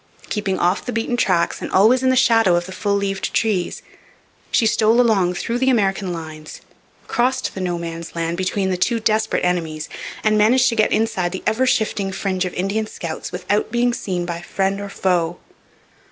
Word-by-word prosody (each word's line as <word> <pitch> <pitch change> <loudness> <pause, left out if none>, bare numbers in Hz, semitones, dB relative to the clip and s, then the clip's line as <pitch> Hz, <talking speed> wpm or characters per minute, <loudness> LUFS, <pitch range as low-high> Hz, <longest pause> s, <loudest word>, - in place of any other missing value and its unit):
Keeping 205 -3 -1
off 180 +3 +1
the - - -4
beaten 230 +1 -1
tracks 180 -7 +1
and - - -5
always 225 +7 +5
in 260 - +2
the 260 - +3
shadow 225 -8 +4
of 175 0 0
the 190 - -9
full 200 +2 -1
leaved 195 -1 -2
trees, 205 -6 0 0.7
she 230 - +2
stole 220 +2 +3
along 195 -7 +3
through 235 +6 -2
the 260 +1 +2
American 195 -5 +1
lines, 155 -2 -8 0.5
crossed 250 +2 0
the 190 - -5
no 175 -1 -1
man's 170 -1 -7
land 165 0 -1
between 190 +1 -1
the 180 - 0
two 230 +6 +1
desperate 220 -2 +1
enemies, 160 -4 -2 0.3
and 215 -1 +3
managed 245 +5 +4
to 230 - -2
get 215 - +2
inside 190 -5 0
the 190 - -5
ever 230 +5 +1
shifting 210 -5 0
fringe 190 -1 -1
of 180 - -4
Indian 200 +4 -1
scouts 170 -6 -6
without 200 +4 -1
being 240 +1 +2
seen 180 -6 -3
by 170 -1 -4
friend 195 +3 -1
or 200 - -6
foe. 175 -3 0
195 Hz, 190 wpm, -20 LUFS, 180-225 Hz, 0.7 s, always